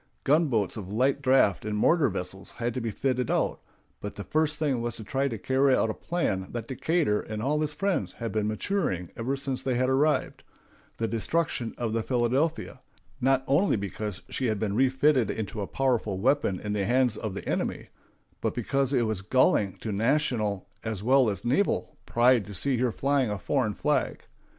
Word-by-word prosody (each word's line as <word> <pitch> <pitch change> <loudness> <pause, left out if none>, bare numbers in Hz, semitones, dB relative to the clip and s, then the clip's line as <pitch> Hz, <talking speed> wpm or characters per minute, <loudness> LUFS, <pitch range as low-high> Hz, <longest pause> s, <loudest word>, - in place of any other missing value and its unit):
Gunboats 135 - +2
of 100 -2 -7
light 130 +6 +1
draft 130 -8 +3
and 105 -1 -2
mortar 155 +5 +4
vessels 95 0 -5
had 120 0 -3
to 130 - -3
be 115 - -2
fitted 125 +2 -1
out; - - 0 0.4
but 105 - -6
the 100 - -6
first 155 +3 0
thing 140 -6 0
was 120 0 -3
to 110 - -8
try 135 +5 0
to 115 -4 -4
carry 130 +4 +3
out 110 - +1
a - - -4
plan 95 - -2
that 115 -1 -4
Decatur 140 -4 +1
and 110 -1 -6
all 145 +6 0
his 150 -1 -1
friends 150 - -1
had 115 -1 -5
been 105 -1 0
maturing 110 - -1
ever 130 +4 -2
since 135 -1 -3
they 130 -2 -1
had 130 +1 +1
arrived—the 135 -4 -2
destruction 120 +1 -1
of 115 -2 -2
the 115 - +1
Philadelphia, 130 +4 0 0.4
not 135 +1 +3
only 160 +9 +3
because 100 -1 -4
she 130 - -2
had 110 -2 0
been 100 -1 -1
refitted 130 0 +3
into 105 -1 -4
a 100 - -3
powerful 120 -7 0
weapon 125 -3 +1
in 105 -1 -3
the 105 -1 0
hands 125 0 +2
of 105 -3 -5
the - - -6
enemy, - - -2 0.5
but - - -1
because 135 +3 0
it 120 -3 +3
was 110 -4 -2
galling 105 -3 +2
to 110 - -3
national 110 -3 0 0.2
as 110 -3 -4
well 130 0 +4
as 100 +1 -5
naval 165 +12 +1
pride 120 -2 +3
to 105 - -8
see 135 +6 +1
her 125 0 +1
flying 135 -1 +1
a 105 - -2
foreign - - 0
flag. - - 0
120 Hz, 190 wpm, -27 LUFS, 105-135 Hz, 0.5 s, mortar